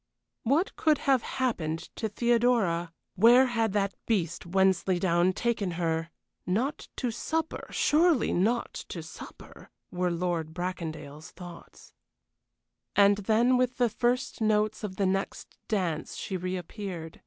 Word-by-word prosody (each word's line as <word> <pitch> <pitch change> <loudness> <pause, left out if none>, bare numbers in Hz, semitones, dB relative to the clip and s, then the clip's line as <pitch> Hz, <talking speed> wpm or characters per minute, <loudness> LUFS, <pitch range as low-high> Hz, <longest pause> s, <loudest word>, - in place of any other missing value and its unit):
What 290 - +1
could 310 -2 +3
have 265 -3 +2
happened 165 -13 -2
to 220 - -2
Theodora? 225 -7 +2 0.2
Where 240 +6 +6
had 230 -4 0
that 200 -1 +1
beast 175 -6 -1
Wensleydown 185 -1 +2
taken 210 -5 -1
her? 165 -1 -1 0.3
Not 245 +11 -1
to 245 -3 -2
supper 320 +7 -3
surely 315 -3 +3
not 225 +7 +1 0.2
to 170 - -6
supper? 160 - -12 0.2
were 180 0 0
Lord 170 -2 -2
Bracondale's 160 -4 -5
thoughts. 175 -2 -12 1.0
And 200 0 +6
then 225 +5 +3
with 255 0 0
the 245 -2 +3
first 245 +3 -1
notes 215 0 +1
of 195 -3 -4
the 195 - 0
next 195 +1 -2
dance 175 -7 -2
she 190 - -4
reappeared. 180 -1 -5
195 Hz, 125 wpm, -28 LUFS, 175-235 Hz, 1.0 s, Where